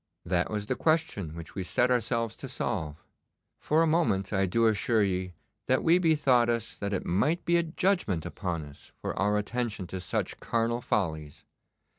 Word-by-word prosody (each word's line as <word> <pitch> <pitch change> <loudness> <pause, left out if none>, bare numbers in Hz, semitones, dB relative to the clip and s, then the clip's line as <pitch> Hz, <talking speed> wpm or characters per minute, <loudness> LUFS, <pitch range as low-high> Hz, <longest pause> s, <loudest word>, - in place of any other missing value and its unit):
'That 90 0 +1
was 105 -1 -3
the - - -1
question 105 - 0
which 85 -1 -9
we 95 - -4
set 125 +7 +1
ourselves 115 -2 0
to 135 - -8
solve. 80 - -3 0.6
For 155 +2 +2
a - - +4
moment 155 - +1
I 95 -1 +2
do 115 +6 +2
assure 110 0 +3
ye 90 -2 -1 0.3
that 130 - +2
we 170 +2 +5
bethought 140 -8 +3
us 115 -2 -2
that 100 0 -2
it 95 - -2
might 145 - +1
be 170 0 +3
a - - +4
judgment 170 - 0
upon 85 -5 -4
us 70 -1 -14
for - - -3
our 105 +2 +2
attention 110 -2 -2
to 95 - -3
such 95 - -3
carnal 115 +1 0
follies. 80 -10 -2
110 Hz, 180 wpm, -28 LUFS, 95-130 Hz, 0.6 s, we